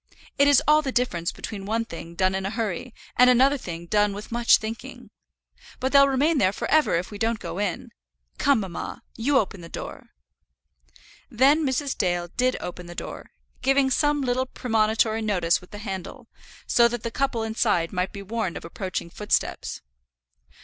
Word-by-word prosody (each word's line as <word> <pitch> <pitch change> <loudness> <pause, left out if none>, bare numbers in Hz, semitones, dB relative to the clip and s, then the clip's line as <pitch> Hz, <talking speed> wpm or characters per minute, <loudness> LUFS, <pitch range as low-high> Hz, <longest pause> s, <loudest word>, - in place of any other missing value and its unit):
It 280 - +6
is 285 - +5
all 305 0 +6
the 275 -3 -3
difference 180 -10 0
between 205 -3 -7
one 225 +2 0
thing 170 -3 -9
done 185 +1 +2
in 190 0 -2
a 195 - -2
hurry, 220 +1 -3 0.3
and 250 0 +7
another 265 +3 +4 0.3
done 205 +2 +2
with 205 +3 -8
much 235 0 +5
thinking. 220 +1 -8 0.7
But 260 +1 -1
they'll 280 -1 +7
remain 280 +3 +2
there 185 -4 +3
for - - -4
ever 310 - +4
if 175 +4 -2
we 205 - -8
don't 225 +1 +1
go 185 - -6
in. 205 -4 -3 0.5
Come, 275 -5 +3
mamma, 190 -3 -6
you 265 +5 +2
open 195 -5 -1
the 165 - -10
door." - - -8 1.2
Then 275 +6 +4
Mrs. 275 0 -1
Dale 175 -2 -1
did 255 +6 0
open 180 0 -7
the 175 - -9
door, - - -7 0.3
giving 270 0 +3
some 295 +2 +2
little 255 0 0
premonitory 220 -2 +1
notice 180 -6 +1
with 180 - -16
the 205 - -9
handle, 205 +4 -7 0.4
so 235 -1 +5
that 240 -1 -4
the 230 - -3
couple 265 -3 -1
inside 215 -6 0
might 180 0 -1
be 200 - -8
warned 215 -3 -3
of - - -9
approaching 175 0 -5
footsteps. 210 +3 -2
225 Hz, 175 wpm, -25 LUFS, 190-260 Hz, 1.2 s, and